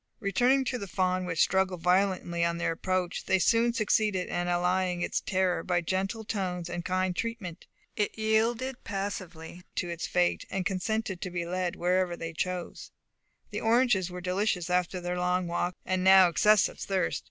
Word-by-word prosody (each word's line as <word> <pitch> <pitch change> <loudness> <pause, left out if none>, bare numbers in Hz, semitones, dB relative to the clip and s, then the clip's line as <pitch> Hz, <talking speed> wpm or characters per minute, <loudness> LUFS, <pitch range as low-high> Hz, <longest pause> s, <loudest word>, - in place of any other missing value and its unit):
Returning 250 +7 +2
to 250 0 -2
the 200 - -6
fawn, 185 -1 0
which 165 -3 0
struggled 190 -2 +1
violently 180 -2 +1
on 170 0 0
their 170 - 0
approach, 185 +1 -2
they 190 - +3
soon 230 +5 +3
succeeded 215 -4 +1
in 175 0 -2
allaying 180 0 +1
its - - -1
terror 185 -2 0
by 175 -1 0
gentle 195 +6 -2
tones 180 -5 -3
and 175 0 -4
kind 185 0 0
treatment. 205 -7 -5 0.3
It 210 +1 -1
yielded 230 +4 0
passively 185 -4 -5
to 175 - -2
its 170 -1 -4
fate, 180 -1 +1
and 190 -1 -2
consented 195 0 -2
to 185 - -3
be 175 -1 -3
led 180 0 -2
wherever 180 0 0
they 165 0 -5
chose. 180 +1 -4 0.6
The - - -3
oranges 225 -5 +3
were 180 0 -7
delicious 180 -1 -1
after 180 +1 0
their 180 0 -3
long 180 0 +1
walk, 175 +1 -2
and 185 -1 0
now 190 -1 +7
excessive 210 +5 +3
thirst. 190 -2 -1
185 Hz, 170 wpm, -28 LUFS, 175-200 Hz, 0.6 s, now